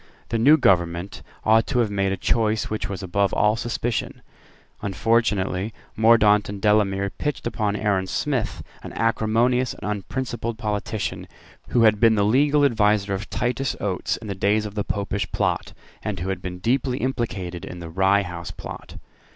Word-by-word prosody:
The 115 Hz, -, 0 dB
new 145 Hz, +7 st, +6 dB
government 85 Hz, -, +1 dB, 0.2 s
ought 110 Hz, +1 st, +4 dB
to 135 Hz, -, -1 dB
have 115 Hz, -4 st, +2 dB
made 100 Hz, -1 st, 0 dB
a 95 Hz, -, -1 dB
choice 110 Hz, 0 st, 0 dB
which 110 Hz, -, -2 dB
was 95 Hz, -1 st, -5 dB
above 100 Hz, +1 st, 0 dB
all 105 Hz, +1 st, +3 dB
suspicion. 115 Hz, -2 st, -3 dB, 0.6 s
Unfortunately 100 Hz, 0 st, 0 dB, 0.2 s
Mordaunt 110 Hz, -2 st, +5 dB
and 100 Hz, 0 st, -5 dB
Delamere 100 Hz, -1 st, +2 dB
pitched 150 Hz, -2 st, -4 dB
upon 105 Hz, -3 st, -1 dB
Aaron 100 Hz, -3 st, 0 dB
Smith, 130 Hz, 0 st, -2 dB, 0.2 s
an -, -, -9 dB
acrimonious 115 Hz, +3 st, +1 dB
and -, -, -7 dB
unprincipled 115 Hz, +2 st, -3 dB
politician, 105 Hz, -1 st, -3 dB, 0.4 s
who 120 Hz, -, +2 dB
had 110 Hz, -2 st, +5 dB
been 115 Hz, 0 st, +5 dB
the 100 Hz, -1 st, +2 dB
legal 145 Hz, +6 st, +4 dB
adviser 105 Hz, -5 st, +2 dB
of 95 Hz, +2 st, -4 dB
Titus 125 Hz, +1 st, -1 dB
Oates 95 Hz, -3 st, -1 dB
in 110 Hz, -, -11 dB
the 100 Hz, -, -2 dB
days 105 Hz, +3 st, +1 dB
of 105 Hz, -, -6 dB
the 105 Hz, -1 st, -2 dB
Popish 100 Hz, -2 st, -3 dB
Plot, -, -, -1 dB, 0.3 s
and 105 Hz, -4 st, -4 dB
who 90 Hz, +3 st, -3 dB
had 95 Hz, -2 st, -3 dB
been 90 Hz, -1 st, -5 dB
deeply 125 Hz, +6 st, 0 dB
implicated 100 Hz, -9 st, -3 dB
in 90 Hz, -, -7 dB
the 85 Hz, -1 st, -7 dB
Rye 95 Hz, +3 st, +3 dB
House 90 Hz, -1 st, -6 dB
Plot. 90 Hz, -, -9 dB
105 Hz, 165 wpm, -23 LUFS, 95-115 Hz, 0.6 s, new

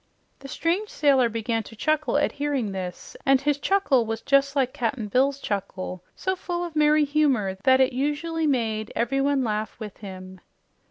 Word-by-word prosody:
The 275 Hz, -, -10 dB
strange 350 Hz, +9 st, -1 dB
sailor 270 Hz, -5 st, +3 dB
began 225 Hz, 0 st, -1 dB
to 225 Hz, -, -12 dB
chuckle 310 Hz, +4 st, +1 dB
at 290 Hz, -, +1 dB
hearing 280 Hz, -7 st, -2 dB
this, 185 Hz, -2 st, -6 dB
and 270 Hz, -1 st, +4 dB
his 290 Hz, +1 st, 0 dB
chuckle 315 Hz, -9 st, +2 dB
was 225 Hz, 0 st, -4 dB
just 275 Hz, 0 st, +3 dB
like 260 Hz, -2 st, +1 dB
Cap'n 230 Hz, -2 st, -2 dB
Bill's 270 Hz, +5 st, +2 dB
chuckle, 185 Hz, -4 st, -4 dB
so 375 Hz, 0 st, -1 dB
full 350 Hz, -1 st, -4 dB
of 335 Hz, -2 st, -8 dB
merry 300 Hz, 0 st, +4 dB
humor 275 Hz, -10 st, +1 dB
that 260 Hz, -1 st, +6 dB
it 260 Hz, 0 st, +3 dB
usually 300 Hz, +4 st, -1 dB
made 220 Hz, -5 st, -1 dB
everyone 270 Hz, +3 st, +1 dB
laugh 215 Hz, -1 st, -3 dB
with 210 Hz, -3 st, -8 dB
him. 185 Hz, -2 st, -10 dB
265 Hz, 170 wpm, -25 LUFS, 220-295 Hz, -, that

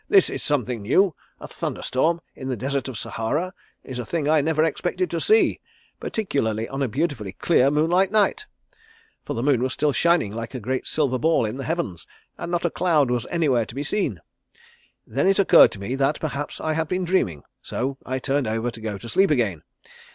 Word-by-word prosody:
'This 390 Hz, -2 st, +5 dB
is -, -, -4 dB
something 125 Hz, -6 st, -1 dB
new. 165 Hz, -, +3 dB, 0.3 s
A -, -, -8 dB
thunder -, -, -4 dB
storm 165 Hz, +6 st, +1 dB
in 130 Hz, -, -7 dB
the 130 Hz, -2 st, -2 dB
Desert 135 Hz, +2 st, -2 dB
of 130 Hz, -4 st, -5 dB
Sahara 150 Hz, -, -2 dB, 0.3 s
is 130 Hz, -2 st, -6 dB
a 120 Hz, -, -4 dB
thing 160 Hz, 0 st, -2 dB
I 155 Hz, 0 st, +4 dB
never 155 Hz, +1 st, +1 dB
expected 180 Hz, +3 st, -1 dB
to 170 Hz, -, -2 dB
see, 440 Hz, +1 st, +3 dB, 0.4 s
particularly 115 Hz, -, -1 dB
on 135 Hz, +1 st, -5 dB
a 135 Hz, -, +2 dB
beautifully 125 Hz, -, -2 dB
clear 140 Hz, -6 st, +3 dB
moonlight 165 Hz, +6 st, +2 dB
night' 215 Hz, -, +2 dB, 0.8 s
for -, -, -4 dB
the 115 Hz, -, -2 dB
moon 135 Hz, -4 st, +3 dB
was 130 Hz, 0 st, 0 dB
still 150 Hz, -1 st, +1 dB
shining 170 Hz, -, +2 dB
like 115 Hz, +3 st, -6 dB
a -, -, -3 dB
great 130 Hz, +3 st, -3 dB
silver 135 Hz, -5 st, 0 dB
ball 160 Hz, -3 st, +3 dB
in 110 Hz, +4 st, -4 dB
the 135 Hz, -, -5 dB
heavens, 160 Hz, -, -3 dB, 0.3 s
and -, -, -6 dB
not 175 Hz, 0 st, 0 dB
a 170 Hz, -, +1 dB
cloud 155 Hz, -8 st, +2 dB
was 120 Hz, -2 st, -1 dB
anywhere 140 Hz, -9 st, +2 dB
to 115 Hz, -, -11 dB
be 140 Hz, -, -2 dB
seen. 150 Hz, -, -1 dB, 0.9 s
Then 135 Hz, +10 st, 0 dB
it 195 Hz, -, +4 dB
occurred 200 Hz, -, +7 dB
to 100 Hz, -, -8 dB
me 100 Hz, +6 st, -4 dB
that 135 Hz, +2 st, +1 dB
perhaps 145 Hz, -2 st, -4 dB
I 155 Hz, -, -1 dB
had 160 Hz, 0 st, -1 dB
been 180 Hz, +2 st, -1 dB
dreaming, 105 Hz, -, 0 dB, 0.2 s
so 135 Hz, +2 st, -3 dB
I 130 Hz, +1 st, -3 dB
turned 135 Hz, 0 st, 0 dB
over 115 Hz, +2 st, -1 dB
to 115 Hz, -, -10 dB
go 110 Hz, -2 st, -3 dB
to 115 Hz, -, -10 dB
sleep 195 Hz, -, +3 dB
again. 110 Hz, -, +1 dB
140 Hz, 210 wpm, -23 LUFS, 120-165 Hz, 0.9 s, occurred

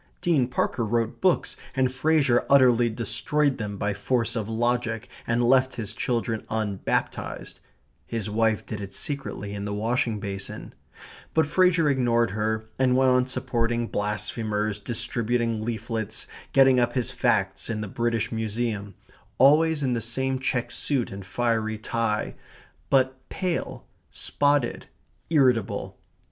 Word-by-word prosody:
Dean 165 Hz, -9 st, +2 dB
Parker 125 Hz, -1 st, -1 dB
wrote 115 Hz, +1 st, -1 dB
books 185 Hz, -2 st, +2 dB, 0.2 s
and 130 Hz, -1 st, +1 dB
Fraser 140 Hz, -3 st, +3 dB
utterly 125 Hz, -4 st, +5 dB
destroyed 125 Hz, +6 st, 0 dB
them 105 Hz, -2 st, -4 dB
by 100 Hz, +1 st, -1 dB
force 115 Hz, +4 st, 0 dB
of 110 Hz, -2 st, -3 dB
logic 115 Hz, -1 st, -1 dB, 0.2 s
and 120 Hz, +1 st, +1 dB
left 130 Hz, +2 st, +3 dB
his 110 Hz, -4 st, -3 dB
children 115 Hz, -2 st, -1 dB
unbaptized 105 Hz, -3 st, -2 dB, 0.5 s
his 115 Hz, -3 st, -3 dB
wife 110 Hz, 0 st, +1 dB
did 105 Hz, -2 st, -5 dB
it 100 Hz, -1 st, -6 dB
secretly 135 Hz, -8 st, -2 dB
in 100 Hz, 0 st, -4 dB
the 105 Hz, 0 st, -3 dB
washing 115 Hz, 0 st, 0 dB
basin 100 Hz, -1 st, -6 dB, 0.6 s
but 160 Hz, -1 st, +4 dB
Fraser 175 Hz, 0 st, +3 dB
ignored 120 Hz, -5 st, +2 dB
her, 110 Hz, +1 st, -1 dB
and 130 Hz, -1 st, +3 dB
went 130 Hz, 0 st, +4 dB
on 125 Hz, 0 st, +3 dB
supporting 120 Hz, -2 st, 0 dB
blasphemers, 105 Hz, 0 st, -2 dB
distributing 115 Hz, 0 st, -1 dB
leaflets, 110 Hz, -1 st, -3 dB, 0.3 s
getting 135 Hz, -1 st, +6 dB
up 120 Hz, 0 st, +1 dB
his 125 Hz, -3 st, -1 dB
facts 95 Hz, +2 st, 0 dB
in 110 Hz, -2 st, -2 dB
the 105 Hz, -, -4 dB
British 115 Hz, +1 st, -1 dB
Museum, 110 Hz, -3 st, -3 dB, 0.4 s
always 150 Hz, +3 st, +5 dB
in 130 Hz, -2 st, +1 dB
the 115 Hz, -, -1 dB
same 130 Hz, +3 st, -1 dB
check 125 Hz, -2 st, -1 dB
suit 135 Hz, -5 st, -1 dB
and 95 Hz, -1 st, -8 dB
fiery 110 Hz, -2 st, 0 dB
tie, 110 Hz, 0 st, -1 dB, 0.6 s
but 130 Hz, -1 st, +2 dB
pale, 180 Hz, -3 st, -3 dB, 0.2 s
spotted, 145 Hz, -3 st, 0 dB, 0.4 s
irritable. 115 Hz, -, +1 dB
115 Hz, 135 wpm, -25 LUFS, 110-130 Hz, 0.6 s, getting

